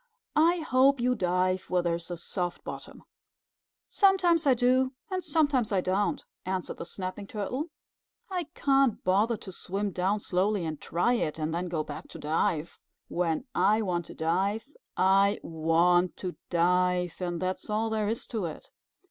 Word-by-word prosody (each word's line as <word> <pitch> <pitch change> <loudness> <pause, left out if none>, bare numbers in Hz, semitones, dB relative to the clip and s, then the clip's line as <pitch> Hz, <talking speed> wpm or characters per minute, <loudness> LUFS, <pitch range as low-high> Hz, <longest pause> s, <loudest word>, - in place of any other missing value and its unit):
"I 335 +3 +4
hope 270 -2 +4
you 250 +1 +2
dive 185 -2 0
where 180 -1 +2
there 170 -1 +1
is 170 +1 -5
a 175 - -4
soft 175 +1 -4
bottom." - - -8 0.8
"Sometimes 360 -5 +3
I 265 - +6
do 255 +2 +2 0.2
and 370 -1 -1
sometimes 285 -7 +2
I 195 - +3
don't," 190 +3 0 0.2
answered 185 -1 -3
the - - -5
Snapping 190 +1 -5
Turtle. 245 - -3 0.6
"I 360 -3 -2
can't 270 -4 +2
bother 210 +5 +2
to 190 - -9
swim 195 +3 -3
down 190 +4 0
slowly 195 0 0
and 155 -2 -5
try 175 +9 +1
it, 160 -11 -1
and 155 0 -2
then 175 +2 -2
go 160 -3 -1
back 145 -1 -8
to - - -10
dive. 155 +1 -1 0.3
When 170 +5 -1
I 215 0 +3
want 175 -4 -2
to - - -10
dive, 195 - -1 0.3
I 195 +2 +4
want 170 +2 +2
to 180 -2 -4
dive, 180 0 +2
and 175 -2 -2
that's 185 +2 -3
all 220 +1 0
there 215 -1 0
is 225 +2 -2
to 220 -6 -2
it." 160 - -7
190 Hz, 165 wpm, -28 LUFS, 175-240 Hz, 0.8 s, I